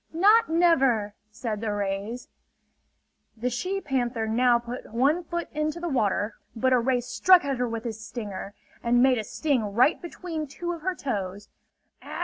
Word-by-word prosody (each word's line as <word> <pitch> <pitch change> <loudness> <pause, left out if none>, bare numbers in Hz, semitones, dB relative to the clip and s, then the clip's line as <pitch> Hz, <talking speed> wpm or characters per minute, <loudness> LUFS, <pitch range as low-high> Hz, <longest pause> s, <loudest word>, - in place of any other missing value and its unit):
"Not 415 +6 +5
never!" 270 -11 +3 0.2
said 215 -1 -4
the 220 -2 -1
rays. 205 +4 -3 1.1
The 250 +3 -1
she 370 +11 -2
panther 245 -7 -1
now 240 +2 +4
put 240 0 -8
one 280 +9 +2
foot 345 +1 -4
into 305 +2 -2
the 345 - -3
water; 210 -4 0 0.2
but 260 +3 +2
a 250 - +5
ray 250 +1 +1
struck 360 +7 +4
at 275 -2 -1
her 245 -1 -1
with 230 0 -5
its 220 -2 -5
stinger, 210 -3 -6 0.3
and 240 +1 +4
made 260 -3 +4
a - - -2
sting 280 +3 0
right 255 +7 +4
between 335 -3 -5
two 345 +5 -5
of 335 -2 -6
her 370 +3 -1
toes. 200 - -4
250 Hz, 165 wpm, -26 LUFS, 220-310 Hz, 1.1 s, Not